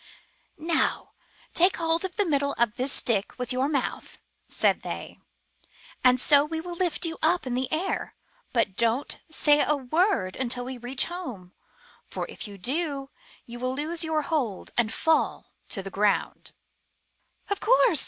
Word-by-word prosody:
Now 325 +1 0 0.4
take 360 +3 +4
hold 330 0 +1
of 375 -1 -4
the 410 - +2
middle 280 -3 +1
of 235 -3 +1
this 260 +2 -1
stick 215 -5 -1
with 250 0 -3
your 260 +3 +1
mouth," 280 -4 -2 0.3
said - - +2
they, - - -6 0.8
''and 255 -1 +6
so 285 +2 +5
we 320 +2 -3
will 350 +2 -6
lift 345 -1 -1
you 325 -1 -4
up 345 +1 +2
in 255 - -2
the 255 +1 -1
air. 330 +5 -2 0.4
But 225 -6 +1
don't 235 +5 0
say 295 -2 +4
a 300 - +3
word 270 - +1
until 245 -1 -2
we 255 -1 -6
reach 250 +2 +1
home, 245 - -7 0.6
for, - - -3
if - - -6
you 200 -1 -10
do, 275 - -2 0.3
you 240 0 -9
will 255 +1 -1
lose 325 +4 -1
your 315 -1 0
hold 270 - -2
and 230 -2 +2
fall 320 0 +1 0.2
to 195 - -3
the 195 - -6
ground." 205 0 +1 1.0
''Of 405 - +1
course 470 - +4
280 Hz, 165 wpm, -27 LUFS, 245-325 Hz, 1.0 s, and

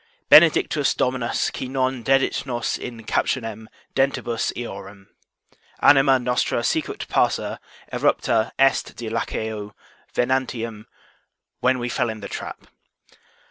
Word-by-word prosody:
Benedictus 155 -2 +5
Dominus 125 -2 0
qui - - -5
non 130 -1 -1
dedit 135 +1 +2
nos 120 -2 -1
in 115 -2 -7
captionem 110 -1 -2 0.3
dentibus 135 -4 0
eorum. 100 -4 -8 0.7
Anima 135 -1 +6
nostra 125 0 0
sicut - - -2
passer - - 0 0.3
erepta 110 - +1
est 135 0 +2
de 115 -2 -6
laqueo 110 -2 -4 0.4
venantium; 120 -4 -1 0.7
when 130 0 +2
we 120 -1 -3
fell 120 - -1
in 110 0 -5
the - - -6
trap. - - -7
120 Hz, 110 wpm, -23 LUFS, 110-130 Hz, 0.7 s, Anima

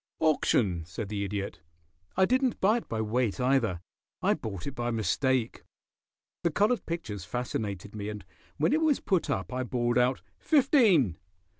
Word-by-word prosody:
"Auction," 110 - +2
said 85 +5 -6
the 105 -1 -2
Idiot. 100 -3 -4 0.6
"I 190 - +6
didn't 255 +2 +1
buy 210 +5 +4
it 235 - -7
by 110 -1 -1
weight, 110 +1 0
either. 125 -9 +1 0.4
I - - +3
bought 100 -6 -6
it 140 - -4
by 120 -2 -2
mistake. 120 +3 0 0.8
The 170 - +2
colored 210 +9 +1
pictures 110 - -4
fascinated 105 -3 -4
me, 105 0 -4
and 105 -3 -7 0.3
when 160 - +2
it 315 - +2
was 310 -4 +3
put 185 -6 0
up 135 - -2
I 130 - -1
bawled 120 -1 0
out 125 +1 +1 0.2
'fifteen.' 225 - +4
125 Hz, 160 wpm, -29 LUFS, 105-170 Hz, 0.8 s, I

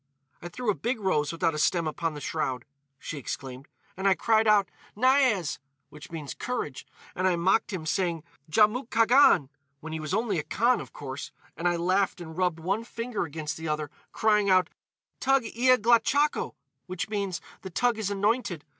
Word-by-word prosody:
"I 175 - -7
threw 240 +4 -1
a - - 0
big 235 +4 -2
rose 155 -7 +1
without 165 -1 0
a 150 - -3
stem 170 +2 +2
upon 155 +1 -2
the 145 - -7
shroud," 130 -1 -2 0.3
she 145 - -6
exclaimed, 135 0 -6 0.3
"and 190 +2 -1
I 190 - +5
cried 220 +2 +2
out, 205 -2 +5 0.3
'Niaz!' 255 - +2 0.3
which 150 0 -12
means, 155 -4 -6
'Courage,' 240 - -4 0.3
and 185 +1 0
I 180 - +3
mocked 190 +7 +2
him, 180 -5 -4
saying, 170 -1 -1 0.3
'Djamouk 220 - +3
Khagan,' 230 - +5 0.3
when 160 +2 -7
he 160 - -3
was 155 +4 -2
only 215 -5 0
a - - -3
Khan, 240 +8 +1
of - - -10
course; 140 -1 -7 0.2
and 175 - -1
I 175 - +2
laughed 185 +3 +1
and 160 -2 -9
rubbed 180 -2 0
one 195 +7 -1
finger 230 -3 -4
against 155 0 -5
the 160 0 -6
other, 150 -1 -2 0.2
crying 210 -2 +2
out, 185 -2 +4 0.5
'Toug 270 -1 +3
ia 255 +2 +5
glachakho!' 240 +6 +2 0.3
which 185 -1 -4
means, 200 -4 -2 0.2
'The 190 - -7
toug 240 +5 +1
is 205 -3 -1
anointed. 200 - 0
185 Hz, 180 wpm, -27 LUFS, 160-225 Hz, 0.5 s, I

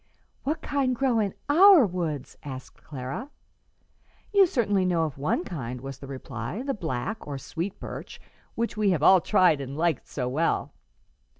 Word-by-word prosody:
"What 305 +4 -2
kind 270 -3 0
grow 250 -2 +2
in 200 -3 -1
our 345 - +8
woods?" 160 -8 -3
asked 130 -2 -9
Clara. 140 - -6 1.0
"You 395 -2 +7
certainly 205 - +1
know 175 -3 +2
of 150 -4 -4
one 150 +5 0
kind," 125 -9 -5
was 135 +1 -8
the 140 - -9
reply 130 - -5
"the 275 0 -1
black, 170 - -4
or 140 -2 -4
sweet, 170 +7 -5
birch, - - -8 0.4
which 235 +1 -2
we 210 -2 +2
have 165 -6 +1
all 185 +1 +7
tried 180 -8 +3
and 135 +1 -6
like 165 -3 +1
so 125 -3 -3
well. 155 +6 0
175 Hz, 165 wpm, -26 LUFS, 140-225 Hz, 1.0 s, our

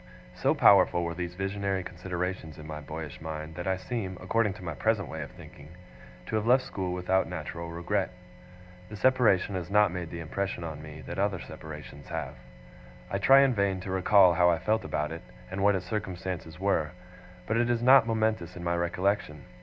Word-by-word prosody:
So - - +1
powerful 85 - +6
were 85 0 -2
these 90 0 -5
visionary 95 0 -2
considerations 90 -2 -4
in 75 - -10
my 75 -1 -6
boyish 80 +3 -7
mind, 80 0 -6
that 90 +2 -5
I 95 0 +1
seem, 95 -1 -4
according 105 +2 +1
to 100 -1 -12
my 80 -2 -4
present 100 +3 0
way 80 - -5
of 70 - -6
thinking, 70 +2 -13 0.6
to - - -3
have 110 +1 -2
left 130 +2 +5
school 95 -7 -4
without 90 +1 +1
natural 85 0 -5
regret. 90 +4 -1 0.8
The 105 - -7
separation 110 -5 +3
has 90 -2 -4
not 105 -2 +4
made 90 -2 -5
the 85 - -6
impression 85 +2 -3
on 80 -2 -6
me, 75 0 -9
that - - -5
other 100 -2 +1
separations 75 -3 -10
have. 65 - -4 0.8
I - - 0
try 135 +1 +7
in 135 -2 +4
vain 100 -3 +1
to 95 - -5
recall 95 -1 +5
how 90 0 +4
I 85 - +3
felt 110 +4 0
about 75 +2 -2
it, 85 +1 -6 0.3
and 95 0 -3
what 100 0 +4
its 95 -1 -3
circumstances 90 -5 -4
were; 95 -5 0 0.5
but 110 - -1
it 120 0 +2
is 120 -1 +1
not 130 -2 +7
momentous 110 -6 0
in 90 - -7
my 85 0 0
recollection. 90 -2 -1
90 Hz, 195 wpm, -28 LUFS, 85-100 Hz, 0.8 s, try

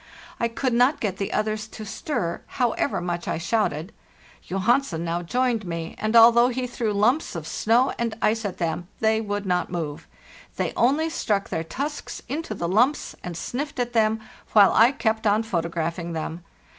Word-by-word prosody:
I 235 - +2
could 245 +2 -1
not 250 +5 +3
get 195 -4 -2
the 195 - -3
others 215 0 -1
to 215 0 -9
stir, 190 - -3 0.2
however 245 +2 +1
much 175 -1 -3
I - - -1
shouted. 175 -2 -1 0.6
Johansen 195 -2 +1
now 170 +1 -1
joined 240 +4 0
me, 165 -2 -5
and, 215 +2 -1
although 235 +1 +8
he 255 0 -2
threw 235 -3 -2
lumps 220 - +1
of 165 -2 -5
snow 230 +10 +2
and 235 -1 -1
_ - - -11
ice 225 0 +1
at 200 -4 -4
them, 170 0 -2
they 220 0 +2
would 205 -1 -3
not 180 -2 0
move; 160 -4 -4 0.5
they - - -1
only 295 +7 +2
struck 200 -9 -1
their 160 - -2
tusks 285 - -5
into 285 -5 -4
the 170 - -2
lumps 245 - +2
and 175 -2 -5
sniffed 280 - -4
at 240 -1 -1
them, 220 -1 +3 0.3
while 205 -3 +7
I 230 +3 +6
kept 220 -5 0
on 210 +2 +3
photographing 170 -3 -2
them. 160 +1 -4
215 Hz, 180 wpm, -24 LUFS, 175-240 Hz, 0.6 s, although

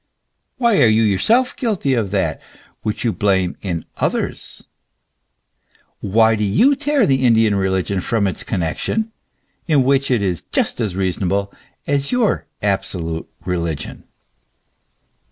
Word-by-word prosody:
Why 235 -5 +3
are - - +7
you 110 +1 +4
yourself 220 - +2
guilty 205 - 0
of 115 -6 0
that 100 0 -1 0.4
which 105 -1 -3
you 115 -3 +1
blame 95 -3 +1
in 85 -5 -3
others? - - -2 1.4
Why 110 +3 +3
do 105 -1 -1
you 230 - +4
tear 290 -3 +2
the 130 -1 +2
Indian 115 -3 +4
religion 95 0 0
from 105 +3 0
its 95 - -2
connexion, 110 - -2 0.6
in 150 -5 +4
which 135 +1 +2
it 120 -5 +2
is 90 -3 -1
just - - 0
as 105 -5 -2
reasonable 95 +1 -1 0.3
as 140 -1 0
your 245 -4 +1 0.2
absolute 85 -5 -2 0.2
religion 85 -5 -3
105 Hz, 130 wpm, -19 LUFS, 95-140 Hz, 1.4 s, are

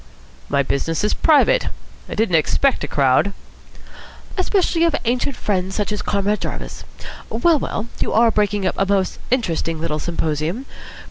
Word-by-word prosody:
"My 140 - +2
business 160 +6 -1
is 210 - +2
private. 410 +11 +4 0.4
I - - -4
didn't 220 -5 0
expect 210 - +2
a - - -2
crowd." 140 +8 +2 1.0
"Especially 370 -3 +1
of 335 -3 +3
ancient 250 +3 0
friends 190 -2 -2
such 210 -1 -1
as 210 - -2
Comrade 205 +1 0
Jarvis. - - -5 0.5
Well, 335 -3 +3
well, 220 - -3
you - - -1
are 230 +1 +4
breaking 205 -2 0
up - - +1
a 195 - +3
most 195 -2 0
interesting 165 -9 0
little 155 -1 -2
symposium. 165 - -2
205 Hz, 150 wpm, -20 LUFS, 165-255 Hz, 1.0 s, private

